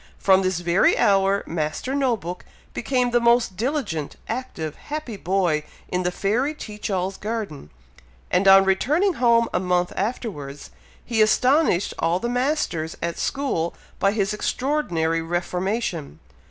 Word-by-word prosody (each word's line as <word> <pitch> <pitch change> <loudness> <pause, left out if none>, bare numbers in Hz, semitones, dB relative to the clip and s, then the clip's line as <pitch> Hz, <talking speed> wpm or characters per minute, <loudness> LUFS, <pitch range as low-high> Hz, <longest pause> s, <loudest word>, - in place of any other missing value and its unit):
From 190 -1 +4
this 185 -2 -1
very 175 +2 +3
hour, 195 0 +3
Master 160 - -3
No 265 -4 +1
book 180 -1 -7 0.3
became 250 0 0
the 240 - +4
most 235 -4 +3
diligent, 225 - -2
active, 165 - -4
happy 295 -6 -6
boy 180 -5 0 0.3
in 180 - -1
the 180 - 0
fairy 235 +11 0
Teach 210 -7 -6
all's 190 0 -1
garden; 210 - -5 0.6
and 185 +2 +3
on 195 0 +8
returning 300 - +2
home 235 -1 +4
a - - +2
month 180 -1 0
afterwards, 185 - -4 0.3
he 230 -3 +1
astonished 250 - +3
all 170 +2 +1
the 235 - -2
masters 245 - -1
at 170 0 -3
school 260 -13 -1 0.2
by 195 - +3
his 205 -1 0
extraordinary 200 - 0
reformation. 175 - -2
195 Hz, 140 wpm, -23 LUFS, 175-245 Hz, 0.6 s, on